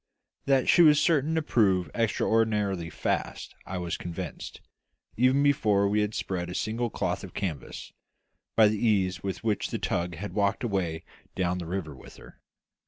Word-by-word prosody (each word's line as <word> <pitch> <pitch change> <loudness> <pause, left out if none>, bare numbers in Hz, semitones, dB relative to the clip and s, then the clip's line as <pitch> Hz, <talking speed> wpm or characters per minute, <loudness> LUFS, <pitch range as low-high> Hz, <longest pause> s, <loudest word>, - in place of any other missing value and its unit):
That 135 -2 +2
she - - +6
was 150 -3 +7
certain 160 -2 +2
to 160 - +1
prove 95 - +2
extraordinarily 105 -5 +1
fast - - -3
I 95 - -4
was 85 -2 -3
convinced, 85 -1 -7 0.6
even 130 +4 +3
before 110 -9 +3
we 105 +1 +2
had 105 +1 -2
spread 90 -2 -3
a 90 - -6
single 115 +2 -1
cloth - - -2
of - - -10
canvas, 85 -10 -5 0.6
by 110 -1 +7
the 105 +1 -1
ease 95 -5 +1
with 95 +2 -4
which 110 -3 0
the - - -2
tug 85 0 -2
had 95 +3 -6
walked 100 +2 0
away 90 -7 -2 0.3
down 90 0 0
the 85 - -6
river 85 -4 -4
with 65 - -14
her. - - -16
100 Hz, 170 wpm, -27 LUFS, 90-115 Hz, 0.6 s, was